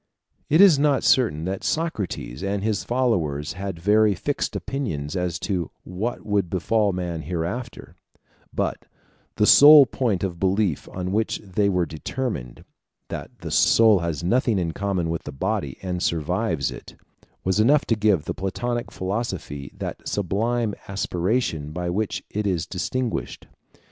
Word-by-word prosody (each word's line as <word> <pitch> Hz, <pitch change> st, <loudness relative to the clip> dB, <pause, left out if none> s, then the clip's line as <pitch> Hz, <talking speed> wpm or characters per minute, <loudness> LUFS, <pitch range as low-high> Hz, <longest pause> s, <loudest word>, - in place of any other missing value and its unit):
It 155 Hz, +5 st, +5 dB
is 180 Hz, -8 st, +7 dB
not 145 Hz, -2 st, +2 dB
certain 95 Hz, -, +3 dB
that 95 Hz, +1 st, -3 dB
Socrates 105 Hz, -, -2 dB
and 100 Hz, 0 st, -2 dB
his 110 Hz, -1 st, 0 dB
followers 85 Hz, -, 0 dB
had 95 Hz, -1 st, -5 dB
very 105 Hz, +3 st, +3 dB
fixed 145 Hz, +10 st, -2 dB
opinions 95 Hz, -, -3 dB
as 90 Hz, -2 st, -1 dB
to 90 Hz, -6 st, -2 dB
what 105 Hz, +7 st, -4 dB
would 100 Hz, -4 st, 0 dB
befall 105 Hz, +3 st, +1 dB
man 90 Hz, -3 st, -3 dB
hereafter; 90 Hz, -, -5 dB, 0.6 s
but -, -, -3 dB, 0.5 s
the 105 Hz, -, +3 dB
sole 145 Hz, +4 st, +9 dB
point 115 Hz, -6 st, -1 dB
of 90 Hz, -3 st, -3 dB
belief 95 Hz, -3 st, 0 dB
on 90 Hz, 0 st, -4 dB
which 110 Hz, +2 st, 0 dB
they 100 Hz, +1 st, 0 dB
were 90 Hz, -3 st, +1 dB
determined 80 Hz, -, -5 dB, 0.4 s
that -, -, -7 dB
the -, -, -6 dB
soul 110 Hz, -3 st, +5 dB
has 85 Hz, -3 st, -3 dB
nothing 115 Hz, +3 st, +2 dB
in 85 Hz, -3 st, -1 dB
common 95 Hz, -2 st, -1 dB
with 85 Hz, -, -2 dB
the -, -, -5 dB
body, 65 Hz, -, -2 dB
and 90 Hz, -1 st, -3 dB
survives 85 Hz, -, 0 dB
it -, -, -11 dB, 0.5 s
was 95 Hz, +2 st, +1 dB
enough 140 Hz, +7 st, +4 dB
to 115 Hz, -, +2 dB
give 105 Hz, -7 st, +2 dB
the -, -, -2 dB
Platonic 120 Hz, +5 st, -3 dB
philosophy 95 Hz, -, -4 dB
that -, -, -5 dB
sublime 110 Hz, +4 st, 0 dB
aspiration 90 Hz, -4 st, -1 dB
by 90 Hz, +2 st, -3 dB
which 95 Hz, -1 st, -2 dB
it 105 Hz, 0 st, -1 dB
is 90 Hz, -5 st, 0 dB
distinguished. 95 Hz, -, -3 dB
95 Hz, 150 wpm, -24 LUFS, 85-115 Hz, 0.6 s, sole